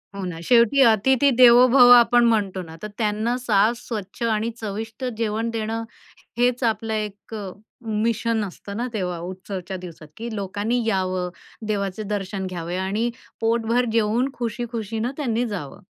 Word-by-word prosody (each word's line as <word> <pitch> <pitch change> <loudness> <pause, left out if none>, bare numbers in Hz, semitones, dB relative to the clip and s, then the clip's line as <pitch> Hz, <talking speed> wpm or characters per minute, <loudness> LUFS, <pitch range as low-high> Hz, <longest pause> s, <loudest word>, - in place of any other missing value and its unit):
हो 195 - -5
ना, 170 -2 -5
शेवटी 240 +3 +5
"अतिथि 260 +6 +4
देवो 250 0 +8
भव" 245 -1 +7
आपण 240 +1 +4
म्हणतो 195 -4 0
ना 160 -1 -11
तर 210 - -4
त्यांना 220 +2 0
साफ, 225 -2 +2
स्वच्छ 215 -1 -6
आणि 225 0 0
चविष्ट 220 +3 -5
जेवण 225 0 -1
देणं 225 0 -3 0.5
हेच 245 +1 +1
आपलं 220 0 0
एक 210 0 -5
अ, 200 -3 -5 0.3
मिशन 225 0 0
असतं 200 +2 -8
ना 245 +2 -2
तेव्हा 180 -4 -2
उत्सवाच्या 185 +1 -6
दिवसात, 170 -4 -10
की 235 +1 -5
लोकांनी 205 +5 -1
यावं, 185 -3 0 0.4
देवाचे 200 0 -2
दर्शन 195 -1 -3
घ्यावे 175 -1 -5
आणि 205 +5 -1 0.3
पोटभर 230 +2 +1
जेवून 230 +4 +2
खुशी-खुशीने 230 -1 -3
त्यांनी 245 -4 0
जावं. 145 +1 -8
220 Hz, 145 wpm, -23 LUFS, 195-235 Hz, 0.5 s, देवो